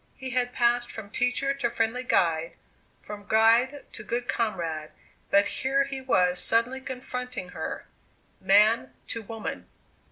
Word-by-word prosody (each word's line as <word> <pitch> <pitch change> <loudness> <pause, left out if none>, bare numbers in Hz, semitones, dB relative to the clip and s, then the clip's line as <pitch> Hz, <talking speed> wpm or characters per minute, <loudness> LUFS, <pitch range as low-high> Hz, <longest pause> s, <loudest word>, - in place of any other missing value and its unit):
He 260 -1 -6
had 245 0 0
passed 240 0 +1
from 205 -2 -8
teacher 250 +4 0
to 265 -4 -1
friendly 230 +2 -1
guide, 165 -8 +1 0.5
from 205 -1 -9
guide 230 +6 +3
to - - -8
good 240 +1 -3
comrade; 170 -10 -2 0.4
but 200 0 +5
here 270 +1 +1
he 270 -1 -5
was 180 -8 +2
suddenly 235 +4 +2
confronting 250 -5 -5
her - - -5 0.5
man 195 - +4
to 230 - -4
woman! 220 +1 -6
230 Hz, 135 wpm, -27 LUFS, 200-250 Hz, 0.5 s, but